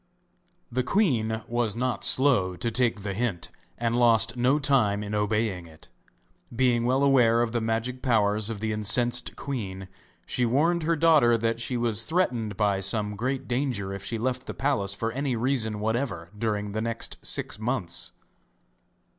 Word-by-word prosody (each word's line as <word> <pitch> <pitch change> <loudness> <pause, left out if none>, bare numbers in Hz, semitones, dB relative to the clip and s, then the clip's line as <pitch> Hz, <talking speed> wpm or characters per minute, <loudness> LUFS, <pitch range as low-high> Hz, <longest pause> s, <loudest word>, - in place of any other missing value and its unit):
The 130 +2 0
queen 120 - +1
was 120 -3 -1
not 125 +1 -2
slow 125 -10 +3
to 115 +7 -2
take 115 -3 +1
the 100 -1 -3
hint, 105 -4 -3 0.3
and 115 0 -1
lost 115 -1 +3
no 125 +4 +2
time 125 -8 +2
in 105 0 -5
obeying 105 -4 -1
it. 80 -1 -17 0.7
Being 120 -1 +2
well 130 +3 +2
aware 120 -4 +4
of 115 - -2
the 120 0 -1
magic 115 +3 -2
powers 105 -4 +1
of 110 -3 -5
the 110 -1 -1
incensed 120 +4 +2
queen, 95 -9 -5 0.4
she 125 - -1
warned 155 +9 +2
her 165 +1 +1
daughter 150 -7 +4
that 115 +1 -1
she 125 +1 -2
was 115 -2 0
threatened 120 - -1
by 100 -2 +1
some 105 +2 -1
great 130 +5 -3
danger 120 -7 -2
if 100 0 -7
she 115 - -3
left 130 +2 -2
the - - -6
palace 115 -9 0
for 115 +2 -2
any 135 +1 -2
reason 115 -3 -1
whatever 110 -6 -2
during 105 -2 -2
the 110 +2 -2
next 115 0 -3
six - - -3
months. 110 -7 -2
115 Hz, 165 wpm, -26 LUFS, 105-125 Hz, 0.7 s, aware